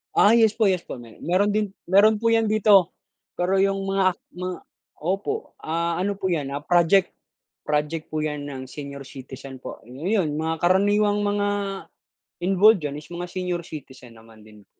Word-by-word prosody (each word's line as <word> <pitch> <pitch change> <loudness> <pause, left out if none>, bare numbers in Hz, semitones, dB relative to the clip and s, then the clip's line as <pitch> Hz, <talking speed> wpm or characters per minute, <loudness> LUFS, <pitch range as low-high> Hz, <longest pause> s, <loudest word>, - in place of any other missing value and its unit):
Ah, 220 +3 +6
yes 220 -2 +4
po, 215 -3 +2
yes 185 -2 -1
po 125 - -7
may 115 -2 -14
mayro'n 185 +4 +2
din 210 0 +1 0.2
mayro'n 210 +3 +5
po 230 - +3
yan 225 -1 +3
dito 205 -4 +4 0.4
pero 185 +2 0
yung 195 0 +2
mga 195 -1 +1
ak - - -28 0.2
ma 180 0 -4 0.4
opo, 195 - -3
ah, 170 +1 -2
ano 200 +3 0
po 190 -1 -3
yan, 145 -5 -2
ah, 145 - -3
project 175 +4 +3 0.6
project 150 +2 -2
po 155 - 0
yan 150 -2 -3
ng 130 -2 -7
senior 140 -1 -8
citizen 130 0 -10
po. - - -9
Ayun, 150 - -1
mga 160 +1 -2
karaniwang 205 +3 +3
mga 205 0 0 1.0
involved 195 0 +5
diyan 145 0 -4
is 150 - -11
mga 175 +1 -4
senior 180 -1 -3
citizen 130 -7 -11
naman 110 -1 -17
din. 105 -1 -17
175 Hz, 175 wpm, -24 LUFS, 150-200 Hz, 1.0 s, Ah